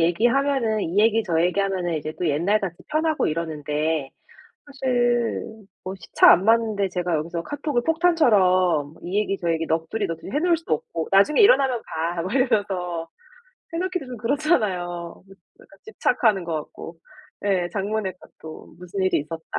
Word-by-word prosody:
얘기하면은 235 Hz, +6 st, +2 dB
이 175 Hz, +5 st, -2 dB
얘기 225 Hz, +1 st, +4 dB
저 170 Hz, -6 st, 0 dB
얘기 180 Hz, +3 st, 0 dB
하면은 185 Hz, -3 st, -1 dB
이제 155 Hz, 0 st, -4 dB
또 180 Hz, -, -1 dB
옛날같이 180 Hz, +4 st, 0 dB
편하고 310 Hz, 0 st, 0 dB
이러는데 155 Hz, -2 st, -2 dB, 0.6 s
사실 245 Hz, -4 st, 0 dB, 0.4 s
뭐 185 Hz, -, -5 dB
시차 175 Hz, -, +5 dB
안 180 Hz, -, +4 dB
맞는데 220 Hz, -3 st, +2 dB
제가 180 Hz, -2 st, -1 dB
여기서 165 Hz, +2 st, -3 dB
카톡을 290 Hz, -, -2 dB
폭탄처럼 185 Hz, -, +2 dB
이 190 Hz, +4 st, -1 dB
얘기 195 Hz, -2 st, -1 dB
저 170 Hz, -2 st, 0 dB
얘기 165 Hz, 0 st, -1 dB
넋두리 165 Hz, +6 st, -1 dB
넋두리해 170 Hz, -, -4 dB
놓을 345 Hz, +1 st, +2 dB
수도 325 Hz, -, -2 dB
없고 160 Hz, +2 st, -6 dB
"나중에 200 Hz, +10 st, +4 dB
일어나면 270 Hz, -, +4 dB, 0.3 s
봐." 170 Hz, -, -2 dB
막 185 Hz, +4 st, -4 dB
이러면서 195 Hz, -10 st, 0 dB, 0.7 s
해 -, -, -2 dB
놓기도 365 Hz, -5 st, -2 dB
좀 250 Hz, -, -7 dB
그렇잖아요. 240 Hz, -, +1 dB
너무 175 Hz, 0 st, -8 dB, 0.4 s
약간 -, -, -20 dB
집착하는 220 Hz, -, +1 dB
것 165 Hz, -1 st, -3 dB
같고 155 Hz, +2 st, -7 dB, 0.5 s
예 185 Hz, -3 st, +1 dB
장문의 200 Hz, -1 st, -2 dB, 0.3 s
카톡 160 Hz, 0 st, -11 dB
"무슨 180 Hz, +2 st, -5 dB
일이 185 Hz, -, +2 dB
있었다." 160 Hz, +2 st, -6 dB
195 Hz, 350 characters per minute, -23 LUFS, 170-240 Hz, 0.7 s, 시차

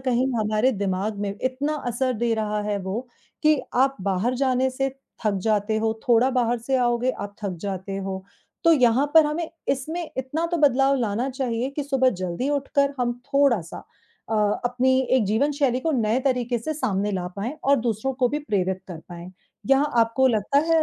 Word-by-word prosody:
कहीं 255 Hz, 0 st, +1 dB
हमारे 215 Hz, +4 st, +2 dB
दिमाग 200 Hz, 0 st, -2 dB
में 200 Hz, -1 st, -2 dB
इतना 275 Hz, +4 st, -1 dB
असर 255 Hz, +2 st, 0 dB
दे 230 Hz, +1 st, 0 dB
रहा 210 Hz, -1 st, -1 dB
है 205 Hz, -1 st, -1 dB
वो 190 Hz, +5 st, -3 dB, 0.4 s
कि 305 Hz, -2 st, +4 dB
आप 270 Hz, +2 st, +3 dB
बाहर 200 Hz, +6 st, 0 dB
जाने 260 Hz, 0 st, +1 dB
से 270 Hz, +1 st, -1 dB, 0.4 s
थक 205 Hz, -, +2 dB
जाते 215 Hz, 0 st, +1 dB
हो, 220 Hz, 0 st, -1 dB
थोड़ा 240 Hz, +2 st, +5 dB
बाहर 245 Hz, -2 st, +1 dB
से 260 Hz, +3 st, -1 dB
आओगे, 245 Hz, 0 st, +1 dB
आप 205 Hz, -4 st, -7 dB
थक 185 Hz, -3 st, -2 dB
जाते 195 Hz, -1 st, -4 dB
हो, 190 Hz, -1 st, -4 dB, 0.4 s
तो 335 Hz, -, +7 dB
यहाँ 255 Hz, 0 st, +4 dB
पर 320 Hz, -2 st, +8 dB
हमें 315 Hz, +2 st, -2 dB, 0.2 s
इसमें 310 Hz, +5 st, -2 dB
इतना 280 Hz, +6 st, -2 dB
तो 345 Hz, -, +2 dB
बदलाव 275 Hz, -2 st, +4 dB
लाना 230 Hz, +3 st, -1 dB
चाहिए 255 Hz, -2 st, -2 dB
कि 295 Hz, -, 0 dB
सुबह 265 Hz, -2 st, +2 dB
जल्दी 185 Hz, +10 st, -2 dB
उठकर 280 Hz, 0 st, +1 dB
हम 240 Hz, -1 st, +1 dB
थोड़ा-सा 275 Hz, -, +1 dB, 0.5 s
अ, 225 Hz, -, +1 dB, 0.3 s
अपनी 255 Hz, +2 st, +2 dB, 0.2 s
एक 240 Hz, -, +2 dB
जीवन 255 Hz, +9 st, +1 dB
शैली 275 Hz, -3 st, +1 dB
को 320 Hz, +3 st, 0 dB
नए 230 Hz, 0 st, +1 dB
तरीके 250 Hz, -2 st, 0 dB
से 310 Hz, +8 st, -4 dB
सामने 205 Hz, -7 st, -1 dB
ला 180 Hz, -2 st, -2 dB
पाएँ 215 Hz, +6 st, -3 dB
और 280 Hz, +1 st, +5 dB
दूसरों 230 Hz, +3 st, -1 dB
को 245 Hz, -, +4 dB
भी 295 Hz, -, -1 dB
प्रेरित 190 Hz, -9 st, -1 dB
कर 170 Hz, -3 st, -7 dB
पाएँ, 175 Hz, +1 st, -8 dB, 0.4 s
यहाँ 275 Hz, +2 st, +3 dB
आपको 230 Hz, +4 st, +3 dB
लगता 225 Hz, +4 st, +2 dB
है 325 Hz, -1 st, +5 dB
245 Hz, 185 wpm, -24 LUFS, 210-270 Hz, 0.5 s, पर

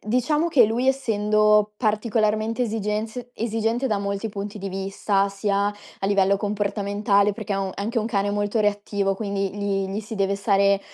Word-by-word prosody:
diciamo 265 Hz, +9 st, +1 dB
che 255 Hz, -8 st, +6 dB
lui, 235 Hz, +4 st, 0 dB
essendo 215 Hz, -4 st, +3 dB
particolarmente 215 Hz, +1 st, 0 dB
esigenz 220 Hz, +2 st, -3 dB
esigente 225 Hz, +3 st, -1 dB
da 210 Hz, -5 st, 0 dB
molti 200 Hz, +2 st, -3 dB
punti 205 Hz, +1 st, -6 dB
di 195 Hz, 0 st, -5 dB
vista, 195 Hz, +1 st, 0 dB
sia 200 Hz, 0 st, 0 dB
a 205 Hz, -1 st, -6 dB
livello 200 Hz, 0 st, +3 dB
comportamentale, 205 Hz, 0 st, +1 dB
perché 210 Hz, -1 st, -5 dB
è -, -, 0 dB
un 195 Hz, -1 st, -2 dB
è -, -, -4 dB
anche 230 Hz, +4 st, -1 dB
un 220 Hz, -, -1 dB
cane 205 Hz, -3 st, 0 dB
molto 205 Hz, +2 st, -1 dB
reattivo, 205 Hz, -1 st, 0 dB
quindi 200 Hz, -1 st, -2 dB
gli 200 Hz, -1 st, -1 dB
gli 195 Hz, +2 st, -3 dB
si 220 Hz, +1 st, -8 dB
deve 200 Hz, -1 st, +1 dB
stare 200 Hz, 0 st, +2 dB
205 Hz, 170 wpm, -23 LUFS, 200-220 Hz, -, che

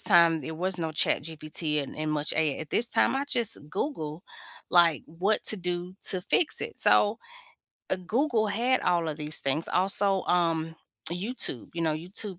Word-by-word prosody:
time 170 Hz, -4 st, +5 dB
there 160 Hz, +3 st, -6 dB
was 185 Hz, +3 st, -2 dB
no 165 Hz, -1 st, -2 dB
ChatGPT 155 Hz, 0 st, -1 dB
and 140 Hz, -, -9 dB
and 155 Hz, 0 st, -2 dB
much 150 Hz, 0 st, -1 dB
a 155 Hz, -3 st, +1 dB
at 155 Hz, -2 st, -8 dB
this 235 Hz, -, +4 dB
time, -, -, +3 dB
I 275 Hz, +1 st, 0 dB
just 235 Hz, -5 st, 0 dB
Google, 165 Hz, -, -4 dB, 0.5 s
like, 170 Hz, -3 st, +4 dB
what 185 Hz, +7 st, -1 dB
to 215 Hz, -, +2 dB
do 180 Hz, 0 st, -4 dB
to 185 Hz, -, 0 dB
fix 250 Hz, -, +2 dB
it. -, -, -5 dB
So, 210 Hz, +2 st, +4 dB, 0.7 s
uh, -, -, +2 dB
Google 235 Hz, -3 st, +1 dB
had 245 Hz, +5 st, +1 dB
all 170 Hz, -2 st, +1 dB
of 150 Hz, -, -4 dB
these 150 Hz, 0 st, +1 dB
things. 140 Hz, +4 st, 0 dB
Also, 195 Hz, +1 st, +2 dB
um, 165 Hz, -2 st, 0 dB, 0.4 s
YouTube, 185 Hz, -, -3 dB
you 170 Hz, -, -2 dB
know, 160 Hz, -2 st, +1 dB
YouTube 180 Hz, +4 st, -4 dB
175 Hz, 175 wpm, -27 LUFS, 155-205 Hz, 0.7 s, time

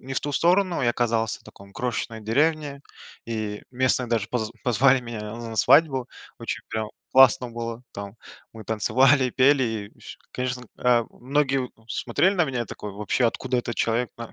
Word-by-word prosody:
не 135 Hz, -, -8 dB
в -, -, 0 dB
ту 145 Hz, -, -4 dB
сторону, 180 Hz, +4 st, +2 dB
и -, -, +2 dB
оказался 115 Hz, -2 st, 0 dB
в -, -, -24 dB
таком, 100 Hz, 0 st, -15 dB
крошечной 120 Hz, -1 st, -3 dB
деревне, 145 Hz, +5 st, 0 dB, 0.4 s
и 110 Hz, -2 st, -4 dB
местные 130 Hz, 0 st, +1 dB
даже 115 Hz, -2 st, -1 dB
поз 110 Hz, -3 st, -2 dB
позвали 130 Hz, +2 st, +4 dB
меня 120 Hz, -3 st, -7 dB
на 115 Hz, -1 st, -7 dB
свадьбу, 135 Hz, -2 st, +4 dB, 0.3 s
очень -, -, -4 dB
прям 110 Hz, -1 st, -3 dB, 0.2 s
классно 130 Hz, -1 st, +6 dB
было, 115 Hz, 0 st, -5 dB
там, 100 Hz, 0 st, -7 dB, 0.4 s
мы 110 Hz, -1 st, -10 dB
танцевали, 130 Hz, +5 st, +3 dB
пели 135 Hz, +2 st, +4 dB, 0.3 s
и -, -, -25 dB
с -, -, -10 dB
И -, -, -29 dB
конечно, 125 Hz, -1 st, -3 dB
э, 120 Hz, -2 st, +3 dB
многие, 135 Hz, +1 st, 0 dB
у, 125 Hz, -, -4 dB, 0.2 s
смотрели 150 Hz, -, +1 dB
на 175 Hz, -3 st, +3 dB
меня 125 Hz, -5 st, -2 dB
такой, 105 Hz, 0 st, -7 dB
вообще: 105 Hz, +5 st, -1 dB
"Откуда 125 Hz, +2 st, -2 dB
этот 120 Hz, -1 st, -3 dB
человек 115 Hz, +1 st, 0 dB
на 115 Hz, -1 st, -8 dB
125 Hz, 175 wpm, -24 LUFS, 115-135 Hz, 0.4 s, классно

